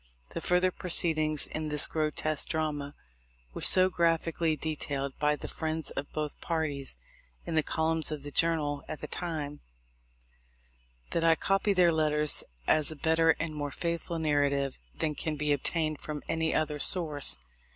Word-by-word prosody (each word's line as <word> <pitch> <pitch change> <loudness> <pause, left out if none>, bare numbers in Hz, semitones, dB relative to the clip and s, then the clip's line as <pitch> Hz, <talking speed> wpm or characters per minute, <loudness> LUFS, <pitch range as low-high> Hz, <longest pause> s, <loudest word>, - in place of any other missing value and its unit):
The - - -5
fur 180 0 +2
ther 185 0 +1
proceedings 155 -4 +1
in 155 0 -5
this 150 -1 +7
grotesque 155 -1 -1
drama 150 -3 -3 0.6
were - - -7
so 185 0 +8
graphically 165 -2 0
detailed 145 -3 -4
by 150 0 +2
the - - -8
friends 160 -1 -3
of 140 - -6
both 150 -1 -5
parties 150 - -2 0.5
in - - -5
the 160 - +3
columns 160 0 -1
of 150 -2 -5
the 145 - -7
Journal 150 -3 0
at 155 - -7
that 150 - -8
time, 150 -4 -5 1.5
that 165 - -1
I 165 0 +4
copy 195 +4 0
their 180 -2 +4
letters 150 -1 +1 0.2
as 155 - +2
a 155 - -5
better 160 +2 +2
and 165 -2 -3
more 145 -1 -4
faithful 170 +2 -4
narrative 145 -3 0 0.2
than 155 - -2
can 155 +1 -3
be 150 0 -2
obtained 155 +1 -1
from 150 -1 -6
any 160 0 -1
other 150 -1 -1
source. 155 -4 +6
155 Hz, 160 wpm, -29 LUFS, 150-165 Hz, 1.5 s, so